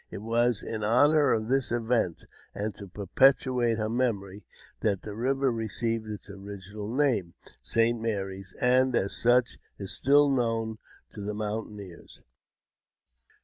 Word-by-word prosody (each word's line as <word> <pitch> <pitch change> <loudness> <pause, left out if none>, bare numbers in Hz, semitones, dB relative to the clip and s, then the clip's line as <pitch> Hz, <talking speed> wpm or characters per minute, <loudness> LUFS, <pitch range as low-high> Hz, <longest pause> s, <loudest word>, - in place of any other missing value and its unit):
It 100 - -8
was 120 0 +1
in 110 -2 -4
honour 145 +6 +4
of 110 -1 0
this 135 0 +1
event, 115 -7 0 0.3
and 105 +1 -3
to 100 +1 -10
perpetuate 120 +4 +2
her 110 -1 -1
memory, 105 -5 -2 0.4
that 100 -4 0
the 105 - -6
river 135 +4 0
received 115 0 -2
its 105 -3 -7
original 100 +1 -8
name, 120 -11 0 0.3
St. 115 0 +1
Mary's, 95 -4 -4
and 125 0 +3
as 100 -3 0
such 120 +1 +2 0.2
is 95 -1 -4
still 145 +2 +4
known 115 -4 0 0.3
to 105 - -9
the 105 +1 -4
mountaineers. 105 -4 -6
110 Hz, 135 wpm, -28 LUFS, 100-125 Hz, 0.4 s, honour